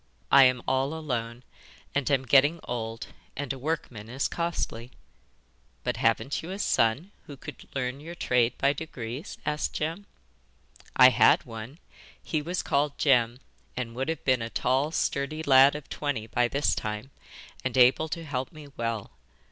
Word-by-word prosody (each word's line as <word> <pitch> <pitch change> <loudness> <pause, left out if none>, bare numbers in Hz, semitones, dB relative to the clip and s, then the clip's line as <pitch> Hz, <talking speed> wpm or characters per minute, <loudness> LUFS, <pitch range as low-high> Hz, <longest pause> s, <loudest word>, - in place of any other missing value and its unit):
I 135 -1 +9
am 125 -1 +2
all 135 +3 +1
alone, 120 -6 -4 0.5
and 140 -1 0
am 135 -2 +2
getting 145 +6 +5
old, 115 -2 -5 0.3
and 140 -1 -2
a 135 - -9
workman 125 -7 -4
is 130 +3 -1
costly.' 170 -8 -3 0.9
'But - - -1
haven't 135 - +1
you 165 - -8
a 190 - -4
son 140 - +1 0.2
who 145 - -9
could - - -11
learn 130 0 -2
your 165 +4 -8
trade 125 -6 +1
by 140 +1 +3
degrees?' 135 - -6
asked 150 0 -1
Jem. 165 +7 -3 0.9
'I - - +9
had - - +5
one: 115 +6 -8 0.5
he 155 - -1
was 175 +4 -3
called 140 0 0
Jem, 125 -3 +3 0.4
and 120 -2 -3
would 130 +5 -3
have 165 - -4
been 130 -3 +3
a 115 - -3
tall 130 +5 +1
sturdy 155 0 -1
lad 135 0 +6
of 150 -2 -7
twenty 140 -7 -3
by 120 +2 +1
this 140 +4 +1
time, 105 +5 -4 0.5
and 130 0 -2
able 130 +5 +5
to 165 +1 -5
help 130 -3 -3
me 155 -3 -12
well. 115 -3 -3
135 Hz, 165 wpm, -27 LUFS, 120-150 Hz, 0.9 s, I